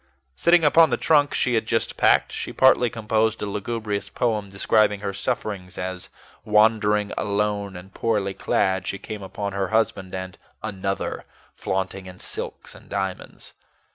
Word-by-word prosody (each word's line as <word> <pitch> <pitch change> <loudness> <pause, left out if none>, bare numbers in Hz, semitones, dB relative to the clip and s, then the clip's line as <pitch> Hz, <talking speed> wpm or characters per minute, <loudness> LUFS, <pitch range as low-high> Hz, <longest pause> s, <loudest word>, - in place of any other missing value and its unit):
Sitting 170 - +4
upon 160 +2 +6
the - - +1
trunk 145 -3 +3
she 125 - +1
had 110 -1 +1
just 115 0 0
packed, - - +4
she - - -5
partly 130 -2 +5
composed 110 0 0
a - - 0
lugubrious 105 0 -3
poem 110 -4 -1
describing 105 +1 +2
her 100 -1 -3
sufferings 100 -4 -3
as, 90 0 -5 0.3
wandering 105 -1 +3
alone 100 -1 -1
and 90 +2 -11
poorly 105 -4 0
clad, 95 -1 0
she 100 - -2
came 105 +1 -7
upon 100 +1 -5
her 100 -1 -1
husband 100 -3 0
and 95 -1 -6 0.2
"another" 95 0 -3 0.3
flaunting 95 0 -3
in 90 0 -10
silks - - -7
and - - -16
diamonds. 95 -2 -5
105 Hz, 150 wpm, -24 LUFS, 95-110 Hz, 0.3 s, upon